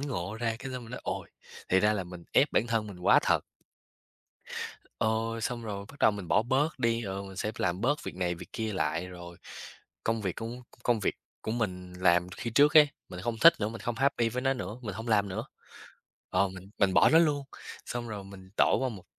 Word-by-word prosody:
ngộ 110 -9 -3
ra, 115 -1 0
cái 130 +1 -6
xong 125 - -5
mình 115 - -12
nói: 125 - -6
"Ồ, - - -3 0.4
thì 95 - +4
ra 105 +1 +4
là 100 -3 -2
mình 90 -1 -10
ép - - +4
bản 115 - +2
thân 115 -2 0
mình 95 -3 -9
quá 90 - +6
thật." - - +3 1.6
Ờ, 110 - +2 0.3
xong 120 +1 -2
rồi 100 -2 -5
bắt 140 - -16
đầu - - +6
mình 100 -4 -6
bỏ - - +4
bớt 135 +7 +1
đi, 115 -2 +1
rồi 100 -2 -4
mình 95 -1 -10
sẽ 105 +2 -2
b - - -20
làm 90 +1 0
bớt 145 +6 +1
việc - - -6
này 90 -1 0
việc - - -11
kia 110 -1 -2
lại, 90 -2 -1
rồi, 85 -1 -10 0.7
công 115 -1 0
việc 95 -3 -2
công 115 +2 -5
c - - -24
công 120 -3 +2
việc - - 0 0.3
của - - -3
mình 90 -6 -3
làm 90 -1 +3
khi 115 - -4
trước 145 +6 +5
ấy, 150 -1 +9 0.2
mình 90 -1 -7
hông 115 -1 -2
thích 165 +6 +9
nữa, 105 - +1
mình 115 0 -7
hông 120 - -1
happy 130 -3 +2
với 125 +3 -3
nó 135 0 +2
nữa, 110 -2 -5
mình 105 -5 -4
hông 110 +3 -6
làm 105 -2 +3
nữa. 95 - -3 0.9
Ờ, 95 +1 +3
mình 95 +1 -11
mình 95 -2 +3
bỏ - - +7
nó 160 - +7
luôn. 150 -4 +3 0.4
Xong 120 -1 -4
rồi 105 -3 -5
mình 95 -1 -12
tổ - - +4
qua 130 - +1
một 105 -7 -8
110 Hz, 240 wpm, -29 LUFS, 95-120 Hz, 1.6 s, ấy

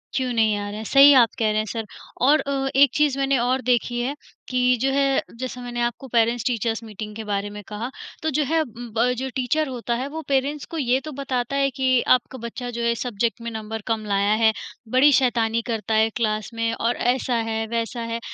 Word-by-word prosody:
क्यों 260 -2 0
नहीं 220 -2 +3
आ 205 0 -4
रहे 205 - -6
हैं? 220 - -5
सही 280 +4 +8
आप 245 -4 +6
कह 220 -2 +2
रहे 215 - -1
हैं 215 - -1
सर। 225 -1 -4 0.4
और 290 +5 +5
अ, 270 -1 -1
एक 280 +1 +7
चीज़ 295 -3 +2
मैंने 275 0 +2
और 255 +2 +1
देखी 240 0 +1
है, 265 +4 -2 0.3
कि 250 0 +3
जो 270 - +2
है 275 0 +2 0.2
जैसे 255 -1 -5
मैंने 240 -1 -4
आपको 240 +3 -2
पेरेंट्स-टीचर्स 230 -1 0
मीटिंग 210 -1 -8
के 220 - -6
बारे 205 -1 -2
में 210 0 -8
कहा, 220 +3 -5 0.3
तो 315 - +1
जो 300 +1 +1
है 325 +3 +1
उम, 240 -4 -7
ब 245 +2 +3
जो 265 +1 -3
टीचर 270 +4 0
होता 240 -2 -3
है, 255 +3 -3
वो 315 +3 -6
पेरेंट्स 280 +2 0
को 330 - -4
ये 255 -2 +2
तो 310 - -5
बताता 265 -2 -3
है 275 0 +2
कि 260 -2 +2
आपका 255 +1 -5
बच्चा 245 +1 -6
जो 235 0 -4
है 235 - +2
इस 235 - -3
सब्‍ज़ेक्ट 235 0 -2
में 235 - -4
नंबर 220 0 -5
कम 225 -1 -1
लाया 200 0 +1
है, 220 - +6 0.4
बड़ी 260 +5 +5
शैतानी 230 -3 +2
करता 225 -1 -2
है 220 +1 +4
क्लास 215 -2 -1
में 230 0 -1
और 230 +1 0
ऐसा 250 0 0
है-वैसा 225 +1 -2
है। 230 - -2
240 Hz, 225 wpm, -23 LUFS, 225-265 Hz, 0.4 s, सही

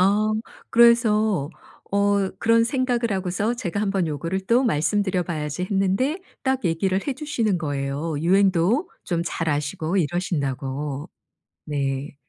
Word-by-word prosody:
어. 205 +3 +3 0.4
그래서 220 - +4 0.4
어 200 -1 +2
그런 230 0 +4
생각을 245 -2 0
하고서 190 +5 -1
제가 205 -4 -3
'한번 195 -4 0
요거를 165 +6 -3
또 245 +3 +4
말씀드려봐야지.' 175 - 0
했는데 200 - +1 0.2
딱 265 -2 0
얘기를 185 +3 +1
해주시는 265 - -1
거예요. 145 0 -2
유행도 195 - +3
좀 170 -2 -1
잘 165 -1 -2
아시고 155 +5 -1
이러신다고. 145 -4 -2 0.6
네. 140 -1 -2
190 Hz, 275 characters per minute, -23 LUFS, 155-220 Hz, 0.6 s, 그래서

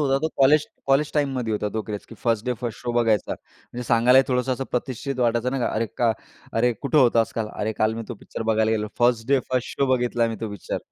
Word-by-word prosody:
होता, 135 -2 +2
तो 160 +3 -1
college 145 +2 +5 0.2
college 140 +2 +2
टाईममध्ये 135 -6 0
होता 105 0 -1
तो 110 - -1
क्रेज, 105 -2 -6
की 115 - -12
फर्स्ट 115 0 -1
डे 125 - +1
फर्स्ट 120 -3 -4
शो 120 - -2
बघायचा. 115 -4 +2
म्हणजे 125 - -10
सांगायलाही 125 +3 +5
थोडंसं 125 +1 +1
असं 135 +1 -3
प्रतिष्ठित 130 +2 -3
वाटायचं, 120 0 +1
नाही 135 -1 -2
का, - - +1
"अरे 115 +1 0
का 115 -2 +3 0.4
अरे 120 +2 +2
कुठं 150 +2 +2
होतास 120 -3 +4
काल?" 110 -2 -2
"अरे 110 +1 -2
काल 110 +1 +2
मी 115 - -4
तो 120 - -4
पिक्चर 110 - -7
बघायला 110 0 +2
गेलेलो, 105 -1 0
फर्स्ट 120 -2 +2
डे 140 -1 +4
फर्स्ट 125 -1 -2
शो 140 - +4
बघितलाय 120 -1 +1
मी 115 - -4
तो 110 -2 -3
पिक्चर." 100 - -4
120 Hz, 235 wpm, -24 LUFS, 115-130 Hz, 0.4 s, college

